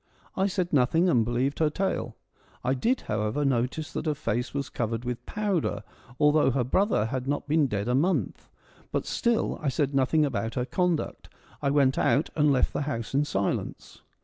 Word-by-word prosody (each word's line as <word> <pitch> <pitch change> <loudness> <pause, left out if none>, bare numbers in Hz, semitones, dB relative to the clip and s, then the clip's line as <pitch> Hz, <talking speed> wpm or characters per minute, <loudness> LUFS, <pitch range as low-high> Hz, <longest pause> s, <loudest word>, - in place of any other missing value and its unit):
I 190 +1 +2
said 185 -3 -2
nothing 150 +6 +3
and 120 -10 +4
believed 120 +5 -1
her 155 -2 +3
tale. 190 +6 -2 0.5
I 125 +1 +1
did, 235 - 0
however, 110 +7 -1
notice 135 +4 -1
that - - -3
her 150 - +1
face 120 -4 -2
was 140 -1 -3
covered 115 0 -3
with 125 0 -4
powder 190 - -1 0.2
— 120 +1 -21
although 150 -2 +4
her 130 -1 +1
brother 185 - +2
had 130 +3 -3
not 145 +1 -2
been 150 -1 +3
dead 105 -2 -2
a 125 - +1
month 165 +9 0 0.2
— - - -28
but - - -1
still 235 -1 0
I 150 - 0
said 140 +1 0
nothing 140 +3 +3
about 115 -4 -2
her 125 - 0
conduct. 180 +2 -1 0.3
I 140 - +1
went 140 -2 +3
out 145 - +2
and 150 -2 +4
left 130 -2 +2
the - - -1
house 115 -3 -4
in 145 +2 +2
silence. 100 -9 -3
140 Hz, 195 wpm, -27 LUFS, 125-155 Hz, 0.5 s, and